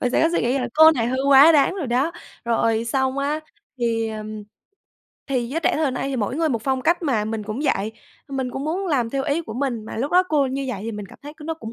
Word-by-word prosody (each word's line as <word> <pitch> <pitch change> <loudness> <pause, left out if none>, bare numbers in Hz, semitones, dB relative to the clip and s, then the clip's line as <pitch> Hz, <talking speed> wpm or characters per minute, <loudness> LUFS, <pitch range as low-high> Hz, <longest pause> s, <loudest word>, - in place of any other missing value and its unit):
mình 250 - 0
sẽ - - +2
có 325 - +4
suy - - +1
nghĩ 250 +3 +1
là 250 -1 -2
"Cô 315 +1 +8
này 235 -5 -1
hơi 260 +2 -1
quá 280 +4 +8
đáng 295 +5 +3
rồi 340 -9 -4
đó". 255 +6 +1 0.3
Rồi 230 -1 +1
xong 265 +2 0
á 295 +3 -1 0.4
thì, 225 -1 0
ừm, 215 -1 -6 0.8
thì 250 -4 -1
giới 320 +5 -2
trẻ - - +2
thời 300 -3 +1
nay 255 +2 -3
thì 270 - -2
mỗi 235 +4 -2
người 325 -1 +1
một 230 -5 -2
phong 265 -1 -1
cách 345 +4 +2
mà, 235 -9 0
mình 220 0 -3
cũng 215 +5 -5
vậy, 220 -5 0 0.4
mình 265 -2 -3
cũng 270 +3 -5
muốn 370 +5 -2
làm 250 -8 0
theo 275 +1 -1
ý 290 +4 0
của 225 -9 -8
mình, 245 -5 -2
mà - - -7
lúc 270 +6 -2
đó 365 - +6
cô 290 -3 +2
như 270 +1 -3
vậy 220 -6 -3
thì 225 +1 -4
mình 210 -1 -6
cảm - - -16
thấy 290 +1 -8
c 310 - -28
nó 320 +2 -4
cũng 225 -8 -9
265 Hz, 275 wpm, -22 LUFS, 230-295 Hz, 0.8 s, Cô